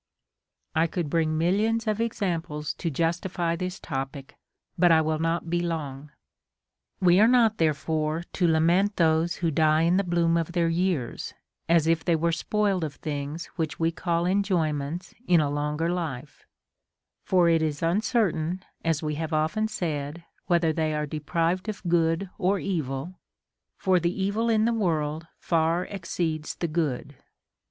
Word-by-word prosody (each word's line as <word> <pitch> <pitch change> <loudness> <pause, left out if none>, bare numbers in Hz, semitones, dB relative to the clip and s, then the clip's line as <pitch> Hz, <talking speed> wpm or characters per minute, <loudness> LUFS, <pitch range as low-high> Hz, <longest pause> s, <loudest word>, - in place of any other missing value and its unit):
I 160 +1 +3
could 165 -3 -3
bring 160 -1 +1
millions 215 +7 +1
of 215 0 0
examples 170 -9 -2
to 170 - -3
justify 170 +2 -1
this 180 +2 -4
topic, 135 0 -5 0.4
but 175 0 +4
I 160 - +6
will 155 0 0
not 165 +1 -1
be 175 +1 0
long. 150 -4 -4 0.9
28. - - -42
We 175 +1 +6
are 215 - +7
not 230 -3 +4
therefore 155 0 0
to 180 - +2
lament 170 +6 +3
those 165 0 +2
who 170 -2 -1
die 155 +1 +3
in 175 +2 +3
the 200 - +2
bloom 170 -2 +2
of 165 +1 -2
their 170 -1 +2
years, 170 -7 -1 0.3
as 165 -2 +4
if 165 0 +2
they 170 - +2
were 170 +1 +1
spoiled 200 +1 0
of 150 -2 -4
things 145 +2 -5
Avhich 155 -2 -2
we 165 0 +1
call 170 0 -1
enjoyments 175 -4 -1
in 175 -2 +5
a 145 -2 +1
longer 150 +2 -1
life; 150 -6 -5 0.8
for 180 -2 +3
it 165 -1 +4
is 150 -2 -1
uncer 205 +4 +2
tain, 170 +4 -3 0.2
as 165 -1 0
we 150 0 -1
have 160 0 -3
often 160 +8 +1
said, 160 -5 -4 0.3
Avhether 170 -2 +3
they 155 -1 0
are 150 0 -1
deprived 165 +6 -1
of 210 - -6
good 165 +2 +2
or 195 +1 +2
evil, 165 -2 -3 0.6
for 185 -1 +2
the 175 +3 -1
evil 215 +4 0
in 220 -1 +3
the 235 - +2
world 160 -6 -1
far 165 +1 +1
exceeds 170 -4 -3
the 170 - -2
good. 145 -4 -2
165 Hz, 160 wpm, -26 LUFS, 155-180 Hz, 0.9 s, are